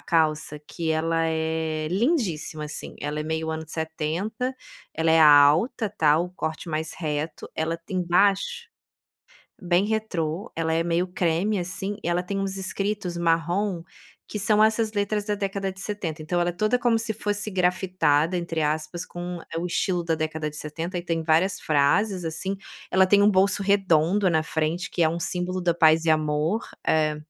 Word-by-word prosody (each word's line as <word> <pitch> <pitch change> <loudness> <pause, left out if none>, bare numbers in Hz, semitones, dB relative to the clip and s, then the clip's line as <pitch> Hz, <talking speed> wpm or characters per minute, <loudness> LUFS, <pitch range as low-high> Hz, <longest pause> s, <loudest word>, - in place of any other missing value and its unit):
calça 155 -2 0
que 165 -2 -3
ela 165 +1 +1
é, 160 -1 -1
lindíssima, 185 - -1
assim, 150 - -7
ela 150 +1 -3
é - - -1
meio 160 +1 -2
anos 160 -1 -5
70, 165 +10 -3 0.4
ela 160 0 +1
é 160 0 +5
alta, 155 - +5
tá 155 -6 +3
o 175 +2 -2
corte 160 -1 -5
mais 155 0 -2
reto, 155 -1 -4
ela 160 +1 -1
tem 170 +3 -5
embaixo, 200 - +1 0.9
bem 175 +1 +2
retrô, 200 -3 -2
ela 160 -1 -1
é 165 - +2
meio 170 +1 +1
creme, 180 +4 0
assim, 190 +3 -3
e - - -1
ela 175 +1 +1
tem 195 +2 -4
uns 195 0 -2
escritos 195 -1 -2
marrom, 170 +3 0 0.5
que 210 - -3
são 210 +1 +3
essas 220 0 +2
letras 205 0 -1
da 210 0 -1
década 195 -1 -3
de 190 - -10
70, 190 -6 -4
então, 175 +3 -1
ela 175 0 +1
é - - -7
toda 215 +7 +1
como 240 -2 +2
se 225 -1 -2
fosse 205 0 -2
grafitada, 180 -3 +1
entre 170 -2 -3
aspas, 155 +3 -2
com 175 0 -6
é 165 - -3
o 170 - -3
estilo 180 0 0
da 165 -1 +1
década 155 -1 -3
de 150 - -11
70 165 +4 -4
e - - -4
tem 165 -2 -2
várias 165 +4 +2
frases, 175 +6 +2
assim, 175 +5 -3 0.4
ela 190 +1 +5
tem 200 +2 +5
um 205 - +6
bolso 200 +1 +3
redondo 195 -1 +3
na 160 -2 +2
frente 160 +4 -2
que 175 - 0
é 160 - +5
símbolo 180 +2 -2
da 175 -1 +2
paz 160 0 +4
e 165 - +3
amor 155 +6 +1 0.3
é, 155 -1 +2
175 Hz, 180 wpm, -25 LUFS, 160-195 Hz, 0.9 s, um